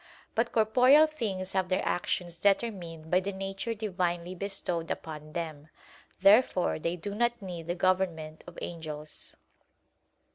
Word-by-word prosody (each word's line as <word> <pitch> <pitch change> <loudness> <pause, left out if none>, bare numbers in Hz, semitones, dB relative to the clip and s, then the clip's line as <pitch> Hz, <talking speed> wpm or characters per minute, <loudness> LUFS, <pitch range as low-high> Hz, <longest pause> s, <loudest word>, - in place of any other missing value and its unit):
But 230 +1 +1
corporeal 250 +7 +6
things 205 -11 -3
have 190 -2 0
their 185 - +1
actions 175 -1 -1
determined 185 -6 0
by 180 - +5
the 195 +2 -3
nature 195 +4 -3
divinely 180 -4 -2
bestowed 180 -3 -2
upon 155 -1 -6
them. 155 -3 -5 0.6
Therefore 195 -4 +5
they 170 +2 -1
do 190 +4 -5
not 240 +2 +1
need 175 -5 -7
the 175 - -1
government 175 -4 0
of 175 - -11
angels. 155 -3 -7
185 Hz, 135 wpm, -29 LUFS, 170-205 Hz, 0.6 s, corporeal